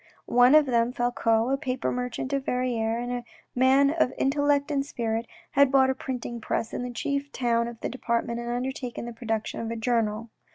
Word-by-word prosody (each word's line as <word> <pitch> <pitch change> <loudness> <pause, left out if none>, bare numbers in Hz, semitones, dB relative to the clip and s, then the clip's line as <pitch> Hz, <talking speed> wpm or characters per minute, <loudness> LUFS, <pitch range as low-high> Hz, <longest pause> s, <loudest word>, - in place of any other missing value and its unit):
One 245 +4 +5
of 305 -1 +7
them, 235 -2 +2
Falcoz, 240 -1 +1
a - - +2
paper 260 -3 -2
merchant 250 +2 -3
of 275 -1 0
Verrieres, 235 -2 0
and 245 - -4
a 245 -1 -3 0.3
man 265 +2 +4
of 315 -5 +1
intellect 285 +1 +1
and 275 -1 +1
spirit, 230 -4 -3 0.2
had 280 -1 +4
bought 265 -1 +5
a - - 0
printing 245 -3 -5
press 220 +1 -2
in - - -3
the 250 - -4
chief 280 +3 -3
town 235 -2 +1
of 235 -1 -8
the - - -1
department 235 -1 -2
and 235 0 -5
undertaken 250 0 -3
the 240 - -6
production 225 -2 -3
of 230 - -3
a 230 - -3
journal. 225 -1 -1
245 Hz, 200 wpm, -26 LUFS, 235-265 Hz, 0.3 s, of